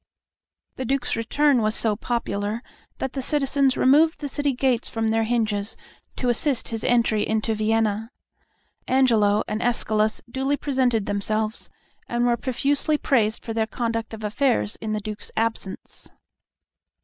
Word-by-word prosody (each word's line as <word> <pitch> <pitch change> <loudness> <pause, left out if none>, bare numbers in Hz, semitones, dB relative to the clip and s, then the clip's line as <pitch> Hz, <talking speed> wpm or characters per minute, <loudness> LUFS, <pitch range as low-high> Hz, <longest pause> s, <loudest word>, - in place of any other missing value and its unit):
The 260 - -3
Duke's 270 +1 -1
return 260 +3 +2
was 215 0 +1
so 220 -2 +3
popular 220 -1 -2 0.3
that 265 - -3
the 270 - -3
citizens 275 -1 +1
removed 305 +5 +4
the 290 - -4
city 285 -1 -1
gates 250 -2 +1
from 225 -1 -1
their 225 0 +1
hinges 220 -3 -1 0.4
to 250 - -1
assist 250 +2 0
his 225 -1 -4
entry 230 -3 +2
into 220 +1 0
Vienna. 220 0 0 0.8
Angelo 225 -6 +3
and 215 +2 -2
Escalus 215 -2 +1
duly 270 +3 -1
presented 255 -7 +1
themselves, 215 +2 0 0.4
and 240 0 +1
were 240 -1 +3
profusely 275 +6 0
praised 225 -6 +1
for 225 - -3
their 220 -1 0
conduct 230 -1 -3
of 220 - -11
affairs 210 - +1
in 215 -1 -4
the 215 - -2
Duke's 210 0 -6
absence. 225 -4 -3
230 Hz, 145 wpm, -24 LUFS, 215-260 Hz, 0.8 s, removed